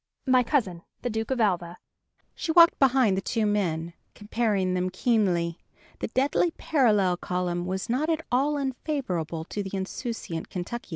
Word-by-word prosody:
My 255 -2 +5
cousin, 225 - 0 0.2
the 245 - -1
Duke 220 0 -3
of 260 -2 -1
Alva." 180 -5 0 0.6
She 330 - -3
walked 335 0 +6
behind 260 -7 +4
the 190 - -1
two 225 +2 -1
men, 170 -5 -1 0.2
comparing 205 -3 0
them 185 0 0
keenly: 185 -5 +1 0.4
the - - -2
deadly 280 +6 +1
parallel 210 - +2
column 180 -1 -2
was 190 +2 -3
not 265 +7 0
at 320 0 -1
all 280 +4 +2
unfavorable 255 - -3
to 205 - -4
the 195 0 -4
insouciant 190 -3 -5
Kentuckian. 195 +7 -5
210 Hz, 155 wpm, -26 LUFS, 180-255 Hz, 0.6 s, walked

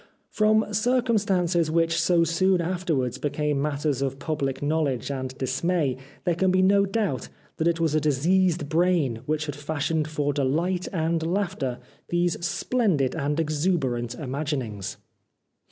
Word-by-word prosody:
From 215 0 +2
circumstances 205 -8 +2
which 165 +1 +2
so 175 -2 +3
soon 180 +3 +2
afterwards 165 -8 -1
became 145 -1 -1
matters 145 -2 -1
of 135 -1 -1
pubhc 135 -3 -2
knowledge 145 -5 0
and 130 -1 -4
dismay 135 +2 0 0.3
there 175 - +1
can 185 +3 +1
be 185 0 +3
no 200 +1 +4
doubt 195 - -1 0.3
that 160 - +1
it 170 -1 +1
was 165 -2 +1
a 155 - +2
diseased 160 +3 +2
brain 160 -7 +1
which 155 0 0
had 145 - -5
fashioned 150 +1 -1
for 145 -2 -1
delight 165 +7 0
and 165 -2 0
laughter 170 -7 -1 0.3
these 175 0 0
splendid 175 - +1
and 150 0 -1
exuberant 145 -7 0
imaginings. 130 - -4
160 Hz, 135 wpm, -25 LUFS, 140-180 Hz, 0.3 s, no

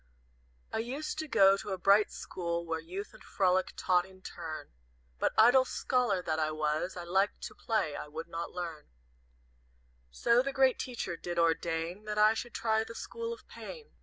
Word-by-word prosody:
"I - - 0
used 275 +7 -3
to 315 - -3
go 195 -7 +6
to 205 - -7
a 190 - -2
bright 200 +3 +5
school 170 -1 -4
Where 165 -1 -2
Youth 185 +5 -7
and - - -15
Frolic 185 -1 +1
taught 180 -1 +3
in 190 0 -16
turn; 160 - -7 0.5
But - - +2
idle 245 +4 +7
scholar 245 -7 0
that 160 -2 -1
I 155 -1 +1
was, 155 +3 -1
I 175 - -5
liked 190 +4 +1
to - - -5
play, 190 -10 -1
I - - -6
would 160 +2 -7
not 170 0 -4
learn; 170 -4 -6 1.2
So 235 - +3
the 275 +1 -3
Great 265 -1 +4
Teacher 240 -8 -3
did 175 0 -5
ordain 165 +3 0
That 210 0 -3
I 215 +1 +6
should 235 +1 -6
try 220 -1 +1
the 230 +1 -10
School 465 0 -5
of 465 - -9
Pain. 465 -2 -10
190 Hz, 185 wpm, -31 LUFS, 170-230 Hz, 1.2 s, idle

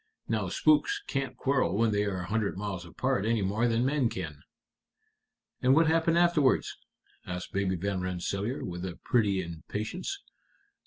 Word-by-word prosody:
Now - - -1
spooks 405 +7 +3
can't 135 -2 -3
quarrel 130 -9 +1
when 115 0 +3
they 105 0 +1
are 95 -3 -2
a - - -5
hundred 105 0 -1
miles 95 -4 -4
apart 130 +4 -1
any 110 -1 +1
more 105 +5 +1
than 115 +1 +1
men 135 -3 +2
can." 80 -8 -6 1.2
"And 130 +2 +5
what 165 +2 +5
happened 165 +1 +3
afterwards?" 170 -6 +3 0.5
asked 90 0 -5
Baby 95 -1 +1
Van 95 +1 -2
Rensselaer, 95 +6 -2
with 90 0 -5
a 90 -2 -5
pretty 100 -6 +2
impatience. 105 - -5
105 Hz, 155 wpm, -29 LUFS, 95-135 Hz, 1.2 s, And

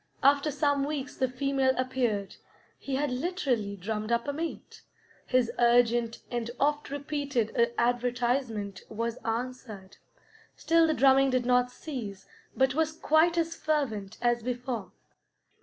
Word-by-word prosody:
After 285 +2 +4
some 285 -1 +1
weeks 285 -1 -3
the 260 - +1
female 265 0 +1
appeared; 245 -6 -1 0.4
he 275 - -3
had 285 0 0
literally 250 - -1
drummed 215 +3 -4
up 235 +2 +1
a 285 - -1
mate; 325 +2 -6 0.5
his 250 -3 +2
urgent 240 -1 +3
and 240 -1 -2
oft 295 +1 +1
repeated 280 -4 -2 0.2
advertisement 240 -3 0
was 230 +2 -3
answered. 225 -4 -5 0.6
Still 330 0 +3
the 315 - +1
drumming 270 0 +5
did 255 -1 +1
not 250 0 +3
cease, 240 -8 -7 0.3
but 265 -1 +3
was 315 +1 +1
quite 320 +2 +3
as 330 0 0
fervent 220 -10 -2
as 240 0 +2
before. 245 -3 -4
255 Hz, 130 wpm, -29 LUFS, 235-285 Hz, 0.6 s, drumming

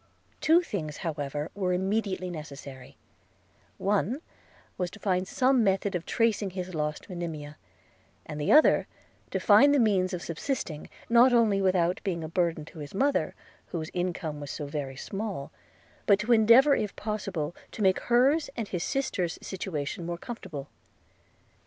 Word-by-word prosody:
Two 330 +3 +4
things, 155 - -4
however, 145 -1 -3
were 185 -3 0
immediately 190 -1 -1
necessary: 140 -5 -9 0.8
one 210 +6 0 0.6
was, 180 -1 -2
to 210 - -13
find 185 -2 0
some 255 +2 +3
method 195 0 +1
of 175 -2 -3
tracing 225 -3 +1
his 185 0 -6
lost 150 -1 -3
Monimia; 160 -5 -6 0.7
and 150 -1 -6
the 150 - +1
other, 305 +1 +6 0.4
to - - -1
find 285 +1 +6
the - - +4
means 195 -5 +3
of 180 -2 -4
subsisting, 165 - -4 0.2
not 240 +2 +6
only 220 -4 +4
without 185 -2 +2
being 175 -5 -2
a - - -4
burden 165 -2 0
to 160 - -12
his 145 +4 -8
mother, 280 +7 +1 0.3
whose 160 -2 -5
income 175 -4 -2
was 145 - -6
so 145 - -4
very 140 -2 -4
small, 195 -1 -5 0.6
but 200 - +6
to 215 +4 +2
endeavor 235 +6 +7
if 210 -2 -2
possible 190 -7 -3 0.2
to 215 - -4
make 190 -1 +4
hers 265 +6 +3
and 225 -3 -3
his 180 -2 -2
sisters' 185 -11 -1
situation 175 -3 -4
more 170 0 -3
comfortable. 170 - -7
185 Hz, 150 wpm, -28 LUFS, 160-215 Hz, 0.8 s, endeavor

